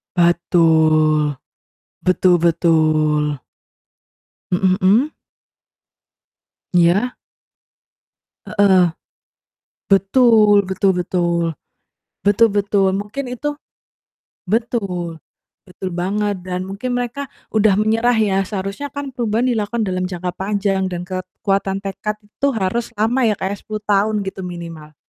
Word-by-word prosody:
Betul. 160 -4 +3 0.6
Betul 185 0 +3
betul. 155 -4 +2 1.1
Mhm 185 +1 +2
mhm. 225 +11 +3 1.6
Iya. 180 +8 +3 1.3
Heeh. 190 -4 +4 1.0
Betul 210 0 +5
betul 190 +1 +1
betul. 175 -1 0 0.8
Betul 205 +3 +5
betul. 200 -1 +2
Mungkin 210 +7 -4
itu 295 - -4 1.0
betul 195 -7 -2 0.5
betul 185 +1 -6
banget, 200 +4 -1
dan 180 0 -3
mungkin 245 +6 -4
mereka 245 +3 -3 0.2
udah 215 -2 +3
menyerah 225 +3 +2
ya, 200 -3 +2
seharusnya 195 +7 -4
kan 285 -1 -6
perubahan 235 0 0
dilakukan 220 0 -1
dalam 185 -2 -2
jangka 180 -1 -4
panjang 195 -1 -1
dan 175 0 -4
kekuatan 195 +1 -2
tekad 210 +2 -4
itu 210 +7 -3
harus 225 +4 -2
lama 230 +3 +1
ya 210 - +2
Kak 190 - -3
ya, - - -2
10 215 -1 -7
tahun 210 +1 +1
gitu 190 0 -6
minimal. 165 -3 -9
195 Hz, 105 wpm, -19 LUFS, 175-215 Hz, 1.6 s, Betul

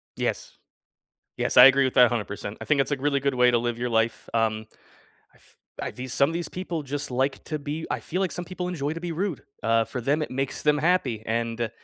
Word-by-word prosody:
Yes. - - -3 0.8
Yes, - - -1
I 125 - +11
agree 135 +1 +6
with 130 - 0
that 125 - +8
100%. 105 -3 -3
I - - -5
think 145 -3 +3
it's 135 - -3
a 145 - +1
really 140 +1 +1
good 140 -1 0
way 125 0 +5
to 120 - +3
live 120 -1 -2
your 120 +1 -2
life, 110 0 0
um, 110 -1 0 0.7
I've - - -23 0.2
I've - - -5
these 125 0 -5
some 140 - +3
of 165 - -4
these 170 0 -3
people 175 -4 -4
just 145 0 -4
like 135 +2 -1
to 155 - -3
be 150 +3 -5
I - - 0
feel 180 +3 -3
like 190 - 0
some 175 - -5
people 180 0 -5
enjoy 150 -4 -2
to 165 - -6
be 175 -1 -4
rude, 185 -1 -3 0.2
uh, 115 0 +3
for 125 +3 -5
them, 145 +6 +1
it - - -4
makes 135 +1 -3
them 150 -1 +3
happy, 150 -9 +1
and 115 0 -2
135 Hz, 240 wpm, -25 LUFS, 120-155 Hz, 0.8 s, I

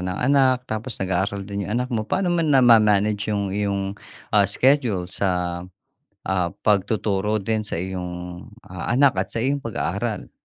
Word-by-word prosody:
ng 90 0 -3
anak, 130 0 +4
tapos, 110 +3 -4
nag-aaral 95 +1 -1
din 100 0 -3
yung 105 - -4
anak 125 - -2
mo. 115 -4 -2
Paano 185 - 0
naman 165 -3 +1
nama-manage 105 -5 +4
yung 100 -1 -1
iyong, 100 0 -2 0.4
ah, 100 - +6
schedule 110 -4 +2
sa, 90 -3 -1 0.7
ah, 90 -2 +1
pagtuturo 105 0 +1
din 110 +1 -1
sa - - -3
iyong, 90 -1 -6 0.2
ah, 90 -1 -7
anak 135 -6 +4
at 95 - -1
sa 115 - -1
iyong 140 +3 +1
pag-aaral? 115 - -3
100 Hz, 155 wpm, -23 LUFS, 95-115 Hz, 0.7 s, ah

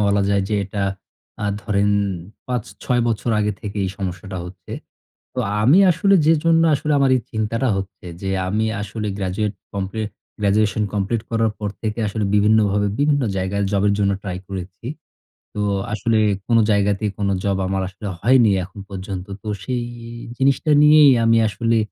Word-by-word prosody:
বলা 100 -1 +2
যায় 100 -1 +2
যে 105 - 0
এটা 100 +1 -4 0.6
আ - - 0 0.2
ধরেন 105 -2 +1 0.6
৫-৬ 125 0 -2
বছর 115 +1 -1
আগে 105 0 +1
থেকেই 105 -2 -3
এই 95 - -3
সমস্যাটা 95 0 -5
হচ্ছে। 90 0 -10 0.6
তো 125 - -1 0.2
আমি 140 - +6
আসলে 195 +4 +3
যে 165 - +6
জন্য 165 0 +4
আসলে 150 +2 -1
আমার 135 -1 +3
এই 125 - -1
চিন্তাটা 115 +4 -1
হচ্ছে 95 -1 -6 0.2
যে 95 - -2 0.2
আমি 105 +3 0 0.2
আসলে 105 +1 -4
গ্র্যাজুয়েট 100 +2 -2 0.2
কমপ্লি 100 +2 -3 0.4
গ্র্যাজুয়েশন 105 +1 +2
কমপ্লিট 105 +3 0
করার 115 -1 +1
পর 105 -1 -2
থেকে 110 +1 -2
আসলে 105 +1 -2
বিভিন্নভাবে 105 -1 +3
বিভিন্ন 145 -1 +2
জায়গায় 95 +2 -1
জবের 100 0 +2
জন্য 100 -1 +2
ট্রাই 90 -3 -4
করেছি। 95 +2 -7 0.7
তো 105 - -3 0.3
আসলে 115 +1 +1 0.3
কোনো 115 -1 +4
জায়গাতেই 100 +1 +1
কোনো 100 -1 0
জব 100 -1 +1
আমার 95 0 -1
আসলে 100 +2 -8
হয়নি 120 0 +5
এখন 95 +3 -10
পর্যন্ত। 95 -1 -5 0.2
তো 110 - -11 0.2
সেই 125 -2 -2 0.5
জিনিসটা 135 +3 +2
নিয়েই 150 -1 +7
আমি 115 0 +4
আসলে 115 +3 0
105 Hz, 160 wpm, -21 LUFS, 100-115 Hz, 0.7 s, নিয়েই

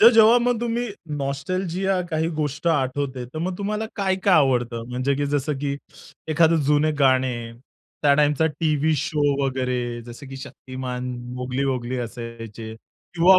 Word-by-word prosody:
तर 230 - +10
जेव्हा 225 +1 +7
मग 245 -1 +2
तुम्ही 240 0 -1 0.3
नॉस्टॅल्जिया 180 +7 -1
काही 160 0 +1
गोष्ट 150 +1 -2
आठवते, 135 -3 0
तर 130 +6 -8
मग 180 +3 -2
तुम्हाला 210 +2 -2
काय-काय 190 -1 +2
आवडतं? 120 -6 +2
म्हणजे 130 +3 0
की 145 +1 0
जसं, 145 +1 0
की 140 0 -1 0.5
एखादं 160 0 +4
जुने 150 +1 +4
गाणे, 130 -3 +2 0.5
त्या 145 -1 +6
टाईमचा 150 +2 +3
टीव्ही 155 -1 +1
शो 150 +1 0 0.2
वगैरे 125 -2 -1
जसं 120 +4 -9
की 135 - -7
शक्तिमान, 130 -2 -6 0.3
मोगली-वोगली 125 0 -1
असायचे. 115 -2 -6 0.4
किंवा 180 +2 +7
140 Hz, 140 wpm, -24 LUFS, 125-165 Hz, 0.5 s, तर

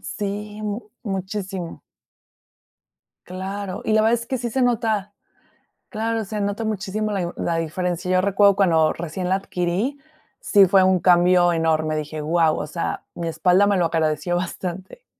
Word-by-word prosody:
Sí, 210 +1 -5
mu 210 +1 -5
muchísimo. 190 -2 -4 1.5
Claro, 190 +1 -5
y 215 - 0
la 215 - +4
verdad 225 +2 +4
es 235 - -8
que 260 - -2
sí 240 -1 -4
se 260 +3 0
nota 220 -4 0 0.8
claro, 225 0 -2
se 210 +1 -5
nota 205 +2 -2
muchísimo 215 0 -2
la 195 -3 -1
i 175 - -1
la 170 - -1
diferencia. 175 +2 -2
Yo 185 0 +4
recuerdo 200 +1 +4
cuando 165 -5 +3
recién 175 +2 -5
la 190 - +2
adquirí, 195 +8 -2 0.4
sí 200 -2 +5
fue 190 -1 +5
un 185 -1 +3
cambio 175 0 +4
enorme, 155 -1 +1
dije: 155 0 -4
"Guau". 160 +1 +2
O - - -3
sea, 165 +2 -4
mi 170 - -5
espalda 180 +5 +3
me 200 -1 +2
lo 175 - +2
agradeció 160 +1 0
bastante. 185 - -5
190 Hz, 160 wpm, -22 LUFS, 175-210 Hz, 1.5 s, sí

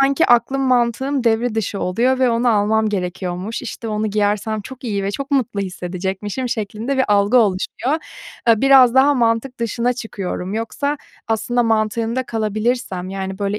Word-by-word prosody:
sanki 275 0 +3
aklım, 245 +3 +3
mantığım 255 +1 +1
devre 230 0 +1
dışı 210 -2 -2
oluyor 245 +8 +1
ve 255 -2 +3
onu 235 +1 +1
almam 220 0 +2
gerekiyormuş, 185 +2 -3
işte, 230 -1 -6
onu 215 0 -1
giyersem 210 +1 0
çok 260 +3 -11
iyi 200 -4 -2
ve 200 - -1
çok 275 +7 -5
mutlu 245 -7 0
hissedecekmişim 190 +5 -4
şeklinde 220 +4 -3
bir 260 - +4
algı 205 +3 +3
oluşuyor. 220 +6 0 0.5
Eee, 225 -2 +5
biraz 265 -3 +6
daha 275 +2 +5
mantık 235 +1 0
dışına 235 +2 0
çıkıyorum. 200 -5 -5
Yoksa 280 +6 -2 0.3
aslında 240 +2 +1
mantığında 225 +2 0
kalabilirsem 215 -3 -2
yani 190 0 -5
böyle 205 0 -1
225 Hz, 155 wpm, -19 LUFS, 205-250 Hz, 0.5 s, biraz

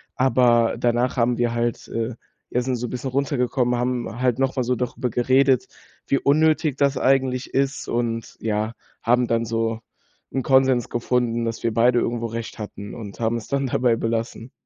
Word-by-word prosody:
Aber 120 -3 +3
danach 120 +2 +1
haben 120 0 +2
wir 120 -1 +1
halt 120 0 -2
äh, 115 +1 -3 0.4
ja, 125 - +1
sind 130 0 -1
so 120 +1 -3
'n - - -8
bisschen 125 +1 -4
runtergekommen, 125 -2 0
haben 125 -1 -2
halt 125 -1 +1
noch 135 0 +1
mal 130 - +1
so 125 +1 0
darüber 125 +1 -2
geredet, 130 +1 +3 0.4
wie 140 - +2
unnötig 155 0 +2
das 140 -2 +2
eigentlich 130 -1 +1
ist, 135 0 0
und 115 -1 -2
ja, 110 +1 -1 0.3
haben 120 +1 +3
dann 115 0 +1
so 115 0 -1 0.5
'n 135 - 0
Konsens 130 -2 +3
gefunden, 120 -1 0
dass 115 0 -3
wir 115 - +1
beide 120 +1 +4
irgendwo 115 0 -1
recht 115 +1 -6
hatten, 105 -1 -7
und 105 -3 -9
haben 115 +1 0
es 110 - -8
dann 140 -1 0
dabei 120 -1 +2
belassen. 115 +1 -3
120 Hz, 180 wpm, -23 LUFS, 115-130 Hz, 0.5 s, beide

